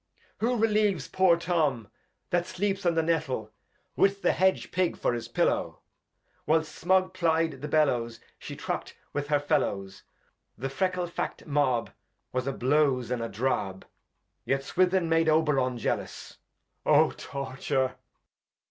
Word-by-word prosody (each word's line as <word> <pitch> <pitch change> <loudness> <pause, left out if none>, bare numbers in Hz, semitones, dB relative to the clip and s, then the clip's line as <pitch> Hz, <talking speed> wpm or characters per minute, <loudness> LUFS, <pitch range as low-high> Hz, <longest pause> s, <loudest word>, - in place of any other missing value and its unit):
Edg. - - -37
Who 240 +2 +1
relieves 210 -8 +2
poor 185 -3 +4
Tom, 155 - 0 0.4
that 175 0 +1
sleeps 195 -1 -1
on 170 - +2
the 165 - +2
JS"ettle, 150 -10 -1 0.4
with 200 0 +2
the - - +4
Hedge 190 0 +1
Pig 180 -1 0
for - - 0
his 120 -1 -5
PiUow. - - 0 0.7
Whilst 155 0 +2
Smug 185 +1 +2
ply'd 165 -5 +1
the 150 - -4
Bellows 125 -7 +1 0.2
She - - -7
truckt - - -4 0.2
with 145 0 -2
her 145 -1 +2
FeUows, 100 -10 -1 0.6
The 135 +5 -3
Freckle 185 +4 0
Fac't 170 - -5
Mab 140 -6 +1 0.4
Was 130 +1 -1
a - - +1
Blouze, 130 -2 +1
and 125 -2 -1
a 115 - -3
Drab, 100 -4 -2 0.6
Yet 135 0 0
Swithin 185 +3 +2
made 165 0 +3
Oberon 145 -5 +2
jealous. 115 - -4 0.4
Oh! - - +5
Torture. 135 -1 -2
150 Hz, 140 wpm, -28 LUFS, 130-175 Hz, 0.7 s, Oh